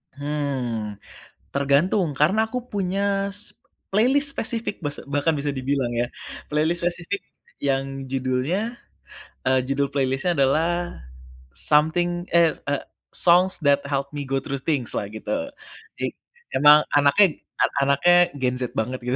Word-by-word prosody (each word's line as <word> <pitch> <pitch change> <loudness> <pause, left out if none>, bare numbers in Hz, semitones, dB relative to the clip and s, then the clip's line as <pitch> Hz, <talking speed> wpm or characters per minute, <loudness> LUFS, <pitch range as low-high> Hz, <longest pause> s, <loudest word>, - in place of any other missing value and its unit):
Hmm. 135 -7 -3 0.6
Tergantung, 145 +5 +2
karena 180 +11 +2
aku 250 +2 -4
punya 200 0 0
s 205 +1 -4 0.3
playlist 265 +8 +3
spesifik 230 -4 -2
basa 145 -3 -5
bahkan 145 +3 +1
bisa 145 0 -2
dibilang 135 -2 -1
ya. 120 0 0 0.4
Playlist 155 +3 0
spesifik 175 +3 -1 0.4
yang 135 -1 -2
judulnya, 135 - -1 0.7
eee, 130 0 +3
judul 140 +1 0
playlist-nya 135 +4 0
adalah 145 +5 +3 0.9
Something 175 - +2
eh, 170 -2 +6 0.2
eee, 145 -1 -1 0.3
Songs 180 -1 +4
that 140 0 +4
help 140 -1 -2
me 145 -2 -5
go 135 0 -1
through 140 0 -3
things-lah, 130 -8 -1
gitu. 270 - -4 0.5
Jik - - -3 0.4
emang 150 +2 +7 0.2
anaknya 150 +5 +4 0.2
an - - +3 0.2
anaknya 175 +6 +4 0.2
gen 125 -2 -1
Z 125 -2 -4
banget, 125 +4 -2
gitu. 125 - +1
145 Hz, 130 wpm, -23 LUFS, 135-175 Hz, 0.9 s, emang